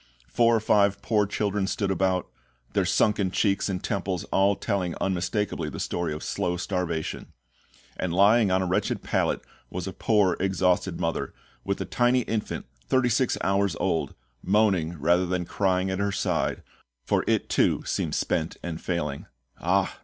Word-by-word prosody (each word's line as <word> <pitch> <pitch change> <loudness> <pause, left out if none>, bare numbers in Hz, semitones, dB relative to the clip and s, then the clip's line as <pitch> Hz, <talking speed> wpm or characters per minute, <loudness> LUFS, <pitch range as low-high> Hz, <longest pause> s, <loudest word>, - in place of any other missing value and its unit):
Four 115 - +3
or - - +3
five 100 -2 +3
poor 105 0 +2
children 100 -1 -1
stood 100 -2 -1
about, 95 -1 +1 0.5
their - - +2
sunken 105 -3 +2
cheeks 100 +1 +1
and 95 -1 -3
temples 95 -3 -2
all 100 +1 +3
telling 95 -6 -2
unmistakably 95 -2 -1
the - - -7
story 85 -2 -2
of 75 - -5
slow 90 0 -1
starvation; 90 -4 -3 0.6
and 90 - -2
lying 100 +4 +5
on 95 0 +2
a - - -1
wretched 90 - -1
pallet - - 0 0.3
was 90 -1 -4
a 95 - -5
poor 100 -5 +2
exhausted 95 -1 +1
mother, 80 0 -2 0.3
with 100 0 -2
a - - -2
tiny 125 +1 +2
infant 110 -2 -3 0.2
thirty 130 - +2
six 120 +2 +1
hours 100 -2 +1
old, 85 -4 -1 0.3
moaning 95 -5 +2
rather 85 +5 +3
than 90 0 -1
crying 95 0 0
at 95 - -2
her 100 0 0
side, 90 -7 -1 0.4
for - - +1
it - - +1
too - - +2
seemed - - -1
spent 80 0 -1
and 85 -2 -5
failing. 75 -6 -3 0.3
"Ah!" - - +1
95 Hz, 160 wpm, -26 LUFS, 90-100 Hz, 0.6 s, lying